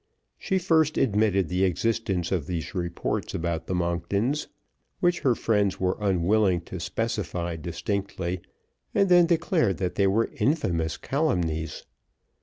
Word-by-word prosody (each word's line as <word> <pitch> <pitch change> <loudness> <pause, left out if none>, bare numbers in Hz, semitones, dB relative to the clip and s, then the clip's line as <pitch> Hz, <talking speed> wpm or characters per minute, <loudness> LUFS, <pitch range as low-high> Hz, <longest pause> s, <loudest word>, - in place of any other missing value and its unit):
She 190 - 0
first 160 -4 +2
admitted 105 -6 +2
the 90 +3 0
existence 95 -1 0
of 85 -7 -1
these 80 -3 -4
reports 85 -2 -2
about 85 -1 -2
the 95 - -1
Monktons 90 - -1 0.5
which 175 -1 +2
her 130 -5 +2
friends 105 -4 +1
were 95 0 +1
unwilling 95 -1 +2
to 95 +2 -8
specify 90 -4 -2
distinctly, 90 +2 -3 0.5
and 195 - +3
then 175 -1 +6
declared 165 - +2
that 90 -1 -2
they 100 -1 +2
were 110 +4 +1
infamous 85 - 0
calumnies. 85 - -1
95 Hz, 130 wpm, -26 LUFS, 85-115 Hz, 0.5 s, then